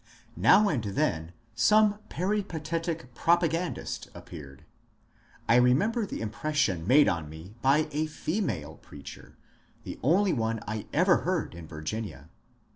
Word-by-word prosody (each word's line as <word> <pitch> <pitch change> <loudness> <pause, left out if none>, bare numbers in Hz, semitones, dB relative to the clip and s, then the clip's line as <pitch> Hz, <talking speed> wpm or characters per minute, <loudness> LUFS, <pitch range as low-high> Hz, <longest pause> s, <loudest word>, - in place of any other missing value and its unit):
Now 210 - +5
and 135 - 0
then 95 - -1 0.2
some 210 - +4
peripatetic 165 -7 -3
propagandist 170 +4 0
appeared. 70 -5 -11 0.8
I 120 +2 +6
remem 130 - +3
ber 230 -4 -1
the - - -5
impression 110 - -1
made 145 +5 +6
on 85 -4 -1
me 80 +6 -11
by 145 +4 +3
a 155 +2 -1
female 155 - -3
preacher, 70 -1 -12 0.5
the - - -8
only 185 - +3
one 115 -3 -1
I 105 0 -4
ever 180 +3 +4
heard 180 - -2
in 85 -2 -10
Virginia. 80 - -6
140 Hz, 125 wpm, -28 LUFS, -, 0.8 s, I